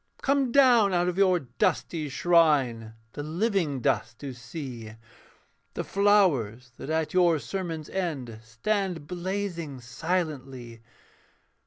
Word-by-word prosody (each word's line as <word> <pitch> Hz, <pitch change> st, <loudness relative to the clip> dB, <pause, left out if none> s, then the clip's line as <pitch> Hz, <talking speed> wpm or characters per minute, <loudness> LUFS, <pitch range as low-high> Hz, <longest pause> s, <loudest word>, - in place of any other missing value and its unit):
'Come 275 Hz, -2 st, +2 dB
down 235 Hz, -8 st, +5 dB
out 175 Hz, 0 st, +2 dB
of 180 Hz, +1 st, -1 dB
your 185 Hz, -2 st, +4 dB
dusty 150 Hz, +4 st, -1 dB
shrine 135 Hz, -8 st, +2 dB, 0.2 s
The -, -, -5 dB
living 165 Hz, -, -1 dB
dust 115 Hz, 0 st, 0 dB
to 140 Hz, -2 st, -5 dB
see, 125 Hz, -3 st, -8 dB, 0.8 s
The -, -, -2 dB
flowers 145 Hz, -, +2 dB
that -, -, -8 dB
at 160 Hz, 0 st, -1 dB
your 175 Hz, -3 st, +4 dB
sermon's 165 Hz, -1 st, -5 dB
end 140 Hz, -12 st, -4 dB
Stand 170 Hz, -, -2 dB
blazing 175 Hz, -5 st, -4 dB
silently. 130 Hz, -4 st, -4 dB
160 Hz, 115 wpm, -27 LUFS, 130-185 Hz, 0.8 s, down